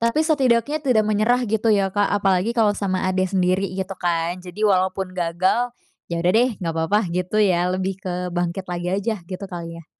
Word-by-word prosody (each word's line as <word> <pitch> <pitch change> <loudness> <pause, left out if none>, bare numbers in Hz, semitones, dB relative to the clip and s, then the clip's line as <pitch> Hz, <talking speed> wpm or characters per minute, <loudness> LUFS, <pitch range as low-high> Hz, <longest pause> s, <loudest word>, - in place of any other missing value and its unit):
Tapi 230 +6 +2
setidaknya 285 -2 +2
tidak 250 -7 +2
menyerah 215 +4 +2
gitu 220 0 0
ya 195 -3 +2
Kak, 205 -1 +2
apalagi 200 +3 +1
kalo 215 -2 +4
sama 190 -2 -2
adek 185 0 +1
sendiri 185 +1 +1
gitu 190 0 -3
kan. 175 0 -1
Jadi 180 +4 -4
walaupun 190 -1 +1
gagal, 185 +8 0 0.3
yaudah 170 +1 +1
deh 245 +3 +4
nggak 165 -3 -3
apa-apa 170 +3 0
gitu 180 +3 -2
ya, 180 -4 +3
lebih 185 +1 -2
ke 180 -1 -4
bangkit 175 +1 -2
lagi 175 -1 -4
aja, 220 +3 -1
gitu 190 +1 -6
kali 170 -3 -7
ya. 165 - -14
190 Hz, 185 wpm, -22 LUFS, 180-215 Hz, 0.3 s, kalo